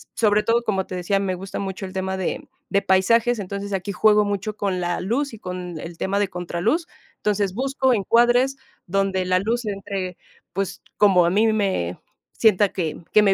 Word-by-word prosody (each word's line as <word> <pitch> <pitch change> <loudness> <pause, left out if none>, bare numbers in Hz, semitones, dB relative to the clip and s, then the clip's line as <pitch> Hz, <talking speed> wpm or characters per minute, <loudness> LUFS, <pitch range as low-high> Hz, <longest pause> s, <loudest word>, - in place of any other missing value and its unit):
Sobre 210 -2 +3
todo, 235 +2 +1
como 195 -4 -1
te 185 - -5
decía, 190 +2 0
me 190 -2 -1
gusta 190 +1 -6
mucho 195 0 -4
el 185 - -8
tema 190 0 -2
de 185 - -3 0.2
de 200 0 +2
paisajes, 230 +5 +3
entonces 200 +1 -5
aquí 195 +1 -2
juego 210 +2 +4
mucho 205 +1 -2
con 195 -3 -1
la 175 0 -1
luz 245 +7 -1
y 220 - -9
con 180 -3 -6
el 165 +1 -8
tema 200 +1 0
de 205 - +2
contraluz. 180 - -1 0.3
Entonces, 205 -2 -1
busco 265 0 +1
encuadres 240 +5 +3 0.3
donde 190 0 0
la 185 0 +2
luz 230 +4 -1
entre, 195 -3 -4 0.4
pues, 195 0 -3
como 190 -4 +5
a 170 - +2
mí 215 +3 +3
me 190 - 0 0.4
sienta, 205 -3 +4
que 165 -5 -3
que 215 - +6
me 195 -1 +5
195 Hz, 190 wpm, -23 LUFS, 185-215 Hz, 0.4 s, que